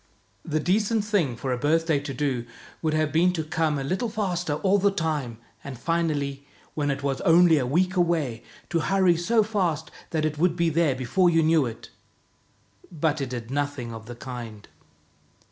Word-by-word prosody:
The 155 -1 -1
decent 210 +5 +1
thing 185 - +1
for 130 +2 -2
a 125 - -3
birthday 160 +1 +2
to 140 0 -6
do 130 -3 -2 0.3
would 155 -1 0
have 155 -1 +1
been 170 +4 +3
to 160 -3 -2
come 155 -1 0
a 135 - -3
little 185 - -1
faster 180 -7 -1
all 195 +5 +2
the 200 +1 +4
time, 155 - -2 0.3
and 135 -3 -7
finally, 145 -2 -1 0.3
when 145 -1 -1
it 140 0 -2
was 135 -1 -1
only 170 -3 +5
a 125 - -1
week 180 +7 +1
away, 165 -10 0 0.3
to 170 - +2
hurry 190 +1 +3
so 215 +7 +2
fast 175 -8 -1 0.2
that 155 -2 0
it 150 -1 -2
would 175 0 +2
be 170 -1 +2
there 155 -4 +2
before 130 +9 +2
you 165 -1 +3
knew 155 -4 +3
it. 115 -1 -9 1.0
But 155 -2 0
it 135 - -3
did 120 -1 -6
nothing 145 -4 -2
of 110 0 -9
the 120 - -7
kind. 120 -4 -8
155 Hz, 185 wpm, -25 LUFS, 135-175 Hz, 1.0 s, only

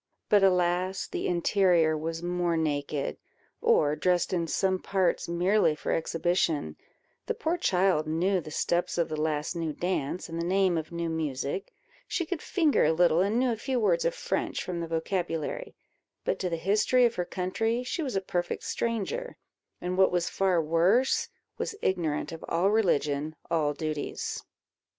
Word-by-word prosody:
But, 205 -1 +5
alas! 185 0 +2
the - - -3
interior 175 -2 +3
was 165 +2 -4
more 175 -1 0
naked, 145 -2 -1 0.4
or 150 0 +3
dressed 180 +2 +1
in 170 -2 0
some 190 +3 +1
parts 190 -2 0
merely 175 -1 +2
for - - -3
exhibition: 165 - 0 0.5
the - - -1
poor 325 +2 0
child 185 - +2
knew 180 +4 +1
the 155 - -9
steps 175 +3 0
of 170 -1 +1
the 155 -1 -3
last 155 +1 -1
new 165 -2 -2
dance 175 -1 -2
and 165 0 -4
the - - -1
name 185 0 +2
of 160 0 -3
new 170 0 -2
music; 155 +1 -3 0.4
she 345 - -1
could 320 0 -4
finger 320 -6 +2
a 155 - +4
little, 170 0 +4
and 205 +4 +1
knew 250 0 +2
a - - 0
few 255 +3 -2
words - - +2
of - - 0
French - - -2
from 180 -2 -4
the 170 - -3
vocabulary; 165 - -3 0.5
but - - 0
to 185 - -1
the 170 - -1
history 215 +8 +3
of 235 - +2
her 180 - -1
country 225 +7 -1
she 255 - -3
was 265 -8 -3
a 195 - +1
perfect 175 -2 -2
stranger, 235 - -2 0.4
and, 180 +1 -3
what 190 - +5
was 175 -1 0
far 190 -3 +2
worse, 170 +11 +2 0.3
was 440 - -3
ignorant 165 -6 0
of 165 - -8
all 180 +4 +2
religion, 155 -8 +1 0.2
all 155 -3 +2
duties. 155 -1 -4
175 Hz, 170 wpm, -28 LUFS, 160-195 Hz, 0.5 s, But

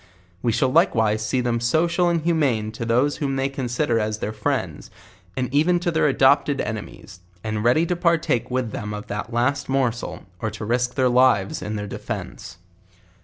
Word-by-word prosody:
We 120 - +1
shall 130 +4 +1
likewise 110 - +3
see 125 +4 0
them 120 -1 0
social 170 +8 +2
and 170 -1 +1
humane 135 -11 +1
to 115 +1 -5
those 125 +5 +2
whom 140 -2 -2
they 135 0 0
consider 125 -2 -1
as 110 0 -1
their 105 0 -4
friends, 105 -1 -3 0.5
and 130 -1 0
even 170 +5 +3
to 175 0 -1
their 160 -3 +2
adop 135 +2 +4
ted 145 -2 -2
enemies; 105 -3 -6 0.2
and 110 -1 -2
ready 125 +8 +3
to 180 - -1
partake 165 -9 +1
with 125 -3 -1
them 105 0 -5
of 105 +2 -7
the 105 -2 -4
last 125 +5 0
mor 135 -3 +2
sel, 100 -6 -7 0.2
or 110 - -2
to 105 0 -7
risk 120 +2 0
their 130 -2 +3
lives 125 -6 +3
in 110 - -4
their 105 -1 -3
defence. 85 -3 -7
125 Hz, 190 wpm, -23 LUFS, 110-145 Hz, 0.5 s, adop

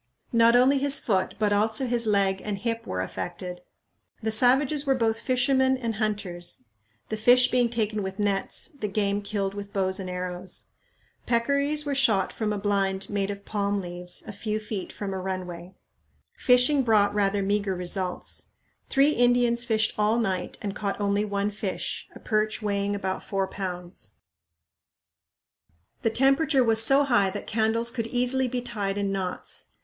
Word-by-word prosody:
Not 230 0 +5
only 265 +3 +5
his 280 0 +3
foot, 190 -4 0
but 210 -1 +1
also 220 +5 +2
his 235 -2 0
leg 195 -2 +2
and 210 -2 -3
hip 230 +2 -3
were 90 0 -2
affected. 175 - -6 0.6
The 220 - 0
savages 265 +6 +4
were 270 -2 +2
both 225 -2 0
fishermen 260 +1 +2
and 230 -4 -3
hunters; 190 -8 -1 0.5
the 220 - -2
fish 245 +3 +5
being 245 -2 +3
taken 215 -2 -1
with 190 0 -5
nets, 205 - -1
the 280 -10 -5
game 200 0 0
killed 200 -1 -2
with 200 0 -7
bows 190 -2 -1
and 185 -1 -5
arrows. 180 0 -5 0.6
Peccaries 280 +5 +1
were 285 - -1
shot 225 -8 +2
from 215 -2 -2
a 210 - -1
blind 195 -1 -1
made 200 -1 -1
of 200 0 -6
palm 205 -1 -1
leaves 180 -1 -5
a 215 - -7
few 215 +1 -3
feet 210 -3 -5
from 200 -2 -5
a 190 - -3
runway. 185 -1 -6 0.6
Fishing 250 +3 +4
brought 215 -4 +3
rather 200 -1 +1
meager 200 -1 0
results. 180 +1 -3 0.4
Three 275 +2 +4
Indians 245 -2 +2
fished 220 -2 +1
all 210 +2 +3
night 190 -6 -2
and 200 -1 -3
caught 200 -1 -3
only 205 0 +1
one 200 0 -1
fish, 205 -2 -4
a - - -10
perch 215 -1 0
weighing 205 -1 -1
about 190 -1 -3
four 195 -1 -1
pounds. 180 - -6 1.9
The 225 - +2
temperature 270 +3 +3
was 225 -1 +4
so 275 +4 +5
high 240 -8 +3
that 200 +2 -6
candles 225 +2 +1
could 230 -3 -3
easily 250 +2 +2
be 250 0 -3
tied 205 -5 -3
in 200 -1 -1
knots. 190 -2 -4
210 Hz, 165 wpm, -26 LUFS, 195-240 Hz, 1.9 s, Not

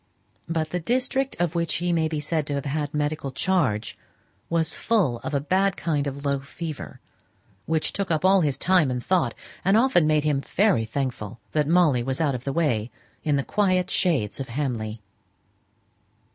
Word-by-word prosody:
But 160 -2 -1
the 180 - -1
district 260 +7 0
of 175 -2 +1
which 170 -2 0
he 175 +1 0
may 160 -1 +2
be 155 -1 -2
said 150 0 -1
to 145 - -1
have 140 - -3
had 145 +1 -2
medical 150 -2 -2
charge 130 - 0 0.5
was 165 -2 +1
full 185 - +1
of 145 - -4
a - - +3
bad 190 +6 +1
kind 145 -4 -1
of 140 +1 -5
low 140 -1 +1
fever, 155 +2 -7 0.7
which 160 -1 0
took 200 -1 -2
up 160 +1 +1
all 190 0 +6
his 145 -4 0
time 180 -6 +3
and 125 -1 -2
thought, 185 -2 +1 0.3
and 195 +3 +4
often 225 -10 +4
made 155 -1 +3
him 145 -2 +1
very 185 - +2
thankful 120 -3 -4
that 150 -2 +1
Molly 160 -7 +4
was 130 +2 -2
out 150 -4 +2
of 125 0 -5
the 140 - -1
way 125 -8 0 0.3
in 150 -2 +2
the 140 - +1
quiet 185 -1 +1
shades 140 - +1
of 135 - -4
Hamley. 115 -5 -3
155 Hz, 185 wpm, -25 LUFS, 135-175 Hz, 0.7 s, all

